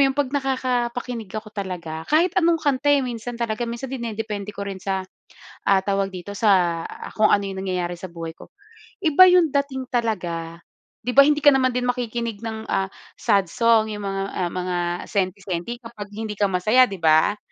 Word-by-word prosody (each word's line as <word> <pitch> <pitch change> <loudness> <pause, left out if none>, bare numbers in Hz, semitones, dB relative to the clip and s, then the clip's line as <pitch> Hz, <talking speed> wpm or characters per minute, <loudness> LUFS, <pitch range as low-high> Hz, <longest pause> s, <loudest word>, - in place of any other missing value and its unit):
yon? 270 - -4
'Pag 280 -2 0
nakakapakinig 250 -4 -1
ako 215 0 -7
talaga, 175 -5 -5
kahit 335 +4 +3
anong 335 0 +4
kanta 285 -2 0
eh, 285 -2 +4
minsan 240 0 -5
talaga, 235 0 -2
minsan 245 +3 -5
nakadepende 210 -4 -4
rin 195 -1 -6
sa, 190 0 -2 0.6
ah, 195 -1 +4
tawag 195 -1 -1
dito, 180 +3 -7
sa 180 -5 +2 0.2
kung 215 0 +3
ano 200 -1 +3
yung 195 -1 -5
nangyayari 180 -2 -3
sa 185 - -6
buhay 165 -1 -7
ko. - - -15 0.4
Iba 365 +1 +7
yung 360 -2 +5
dating 265 -2 -1
talaga. 175 -8 -2 0.5
'Di 250 - -1
ba 280 - +9
hindi 295 +1 +4
ka 290 -1 +6
naman 260 -1 +3
din 250 0 -1
makikinig 235 -3 -2
ng, 220 -1 -5
ah, 195 0 -1 0.2
sad 200 -4 +2
song 220 +3 +2
yung 205 - -6
mga 195 0 -2
ah, 180 -2 -1
mga 180 0 -3 0.3
senti-senti 195 +2 -2
kapag 230 -4 -9
hindi 215 +1 -5
ka 205 -1 +1
masaya, 215 +8 +4
'di 195 - -6
ba? 160 +5 +4
215 Hz, 180 wpm, -23 LUFS, 190-250 Hz, 0.6 s, ba